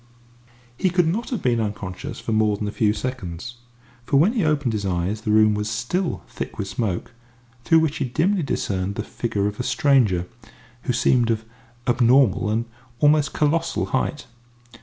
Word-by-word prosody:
He 185 - +1
could 180 -1 +2
not 210 +9 -1
have 240 -8 -3
been 120 -2 +2
unconscious 100 -3 -5
for - - -4
more 110 -1 +2
than 105 - -3
a - - -2
few 110 -2 +2
seconds, 120 -2 -5 0.5
for 140 +3 +1
when 180 +11 +4
he 225 -6 +1
opened 150 -6 +1
his 105 -2 -2
eyes 95 +3 -1
the 110 - -4
room 110 0 +5
was 105 +1 -2
still 120 - -2
thick - - -6
with 95 - -3
smoke, 100 -1 -3 0.5
through 165 -1 +5
which 160 -1 0
he - - -1
dimly 175 +10 +1
discerned 100 - -2
the 105 - -3
figure 105 -4 -2
of 105 0 -3
a - - -1
stranger, 125 - +2 0.6
who 125 - 0
seemed 120 -1 +3
of 110 -1 -1 0.4
abnormal 120 -3 +3
and 110 +2 0 0.3
almost 150 0 +4
colossal 165 +3 +1
height. 130 +3 -1
120 Hz, 175 wpm, -23 LUFS, 105-150 Hz, 0.6 s, room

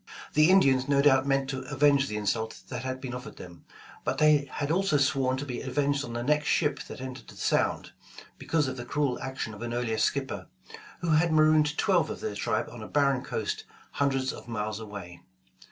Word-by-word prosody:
The 155 +2 +5
Indians 135 -9 +4
no 140 -1 +3
doubt 135 -1 +4
meant 135 -1 +1
to 135 - -3
avenge 140 -1 +4
the 105 - -3
insult 110 0 -2
that 125 - -4
had 130 0 -4
been 130 -2 -6
offered 125 +2 -8
them, 85 -1 -12 0.4
but 130 - -1
they 150 -2 +4
had 145 0 -2
also 185 -3 +2
sworn 135 -2 +1
to 140 - -4
be 125 -3 -5
avenged 140 +1 0
on 120 - -6
the 120 0 -3
next 150 +3 +1
ship 150 -3 +1
that - - -9
entered 130 -1 -8
the - - -13
Sound, - - 0 0.5
be - - -11
cause 155 -4 +2
of 130 0 -4
the 120 - -5
cruel 140 -1 -1
action 130 -4 -4
of 105 - -11
an 120 0 -3
earlier 115 -2 -1
skipper, 135 +4 -1 0.5
who 170 -2 0
had 160 +2 +3
marooned 155 -1 +4
twelve 180 -4 +2
of - - -5
their - - -3
tribe 110 +1 -1
on 120 - -9
a 110 - -7
barren 140 -3 +2
coast - - -3 0.3
hun 140 0 +1
dreds 130 -1 -1
of - - -11
miles 110 -2 -3
away. 100 -5 -9
135 Hz, 215 wpm, -28 LUFS, 120-145 Hz, 0.5 s, The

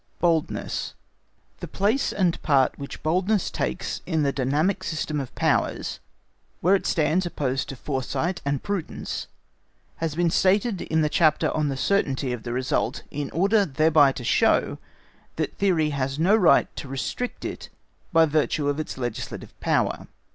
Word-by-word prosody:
Boldness 165 -3 -1 0.6
The - - -6
place 215 +8 +1
and 180 -4 0
part 140 -3 +2
which 140 - -8
boldness 185 +5 +1
takes 60 +1 -3
in 160 -2 +1
the 140 - +2
dynamic 145 +9 0
system 155 -2 -2
of 135 -3 -6
powers, - - 0 0.6
where 180 +4 +3
it 195 - +1
stands 170 +3 +1
opposed 135 -5 -2
to 135 - -5
Foresight 145 +7 -2
and 140 -1 -1
prudence, 200 -5 -4 0.7
has 160 -2 -2
been 170 0 +2
stated 195 +3 +2
in 160 0 0
the 155 - +2
chapter 155 0 +3
on 155 -1 0
the 135 - -3
certainty 135 -7 0
of 120 - -5
the 120 - -5
result 130 +2 -1
in 145 -1 -3
order 200 +6 +3
thereby 155 -2 +4
to 125 - -7
show, - - +2 0.6
that - - -2
theory 170 -6 +2
has 135 -1 -2
no 180 +7 +4
right 195 -6 +4
to - - -6
restrict 135 - -4
it - - -6 0.4
by 165 -2 +6
virtue 150 -1 +1
of 145 +1 -1
its 155 - -5
legislative 120 -4 -5
power. - - 0
155 Hz, 155 wpm, -25 LUFS, 135-180 Hz, 0.7 s, by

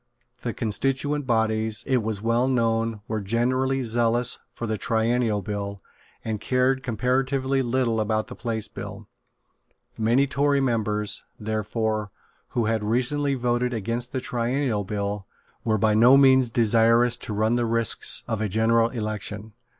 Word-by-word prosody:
The 120 - -2
constituent 135 +6 -1
bodies, 110 -2 0
it 130 -3 +2
was 110 -1 -4
well 115 +2 +2
known, 115 -3 0
were 110 -1 -2
generally 130 +5 0
zealous 120 +1 +1
for 115 - -6
the 110 -1 -1
Triennial 110 0 0
Bill, 100 0 -4 0.5
and 110 -2 -3
cared 130 +2 +1
comparatively 130 +3 0
little 120 -3 0
about 110 0 0
the 130 - -9
Place 115 -3 -3
Bill. - - -8 0.9
Many 120 +5 +3
Tory 140 +1 +1
members, 105 -5 0 0.2
therefore, 110 0 -2 0.5
who 115 - +2
had 110 -1 0
recently 135 +6 +1
voted 125 0 0
against 115 +3 -3
the 130 - -2
Triennial 120 -2 -1
Bill, 100 0 -3 0.4
were 110 -1 +1
by 110 +1 +2
no 120 +5 +7
means 130 -2 +5
desirous 115 +1 +3
to 115 - -7
run 110 +3 +2
the 120 -1 0
risks 115 -1 0
of 115 -3 -2
a 110 - -1
general 115 +3 +3
election. 105 -2 -5
115 Hz, 140 wpm, -25 LUFS, 110-125 Hz, 0.9 s, no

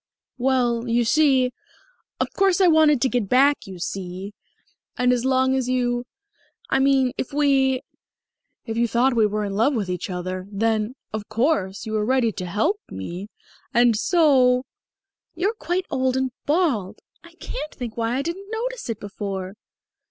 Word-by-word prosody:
"Well, 245 -2 +1
you 235 +1 +2
see 265 -2 +3 0.7
of - - -1
course 390 -1 +2
I 380 - +5
wanted 315 -5 +5
to - - +4
get 245 -6 -1
back, 275 -1 +3
you 190 -1 -8
see 185 +2 -5 0.6
and 250 -1 +3
as 245 0 -1
long 260 0 +3
as 255 -2 -1
you 245 -1 0 0.7
I - - +3
mean 270 -2 +3
if - - -3
we 270 -2 +2 0.8
if 225 -1 -4
you 235 0 +2
thought 240 +3 +2
we 220 -2 +4
were 210 0 -2
in 200 - -4
love 230 +8 +2
with 200 -5 -2
each 180 +2 -4
other, 185 +1 -4
then, 220 +3 0 0.2
of 215 -1 -5
course, 220 -5 0
you 220 - -5
were 215 -1 +1
ready 245 0 +2
to 185 - -6
help 220 - 0
me. 175 - -6 0.5
And 240 -1 +5
so 255 - +4 0.4
" - - -58
"You're 385 +6 0
quite 360 -2 -2
old 260 0 +1
and 260 -1 0 0.2
bald. 275 - +1 0.3
I 340 0 -16
can't 345 -2 -6
think 240 -4 -7
why 230 +1 -1
I 270 - -1
didn't 375 +5 -5
notice 470 - -4
it 225 - -3
before." 195 -2 -5
250 Hz, 170 wpm, -23 LUFS, 215-275 Hz, 0.8 s, I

